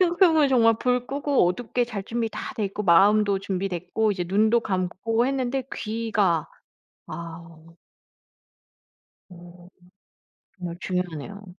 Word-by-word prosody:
생각 350 +1 +2
해보면 320 -5 +5
정말 230 -3 +4
불 250 -1 0
끄고 280 -6 +1
어둡게 245 +5 -1
잘 215 -5 -5
준비 230 0 -2
다 - - -6
돼 215 - -2
있고 200 +2 -4
마음도 200 +3 +4
준비됐고 195 +2 -2
이제 180 -2 -3
눈도 220 +5 +3
감고 215 +4 -1
했는데 265 -1 -1
귀가. 215 -7 0 0.6
아. 165 -1 -9 1.7
어. 175 0 -14 0.9
정말 175 -1 -6
중요하네요. 180 +2 -4
205 Hz, 245 characters per minute, -24 LUFS, 180-240 Hz, 1.7 s, 해보면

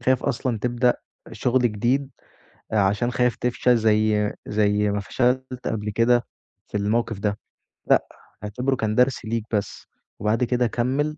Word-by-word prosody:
تخاف 130 -1 +2
أصلًا 125 -3 -1
تبدأ 120 +2 +2 0.4
شُغل 130 +1 +1
جديد 120 +5 +1 0.6
آآ 110 - +2
عشان 105 +5 +2
خايف 125 -1 +1
تفشل 125 0 +2
زي 110 -1 +2
زي 105 0 +2
ما 100 0 -1
فشلت 125 +4 -1
قبل 105 -1 -2
كده 120 +3 +3 0.4
في - - -4
الموقِف 110 +1 0
ده، 105 0 -1 0.5
لأ، - - +4 0.4
اعتبره 125 +6 -1
كان 110 -3 -1
درس 125 0 +2
ليك 115 0 -2
بس، 105 -2 -3 0.3
وبَعد 110 +3 +1
كده 125 0 +1
كمّل 135 +7 -1
120 Hz, 145 wpm, -23 LUFS, 105-125 Hz, 0.6 s, لأ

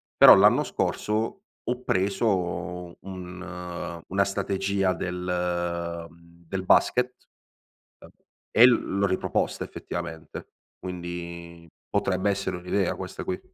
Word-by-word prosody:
però - - +10
l'anno - - +6
scorso 110 - -1 0.2
ho 125 +1 -3
preso 90 -4 -1
un 90 -2 -7
una 100 +2 +2
strategia 95 -1 0
del 85 -2 -2 0.4
del 95 +2 -3
basket, 125 +6 +4 1.4
uhm, 110 - +6
e - - +12
l 115 -5 +1
l'ho 100 - +3
riproposta, 95 -1 -1
effettivamente. 80 0 -7 0.3
Quindi 85 -2 -7 0.2
potrebbe 95 +1 +1
essere 100 -2 -2
un'idea 90 +1 0
questa - - -6
qui. 90 - -3
90 Hz, 100 wpm, -26 LUFS, 85-100 Hz, 1.4 s, e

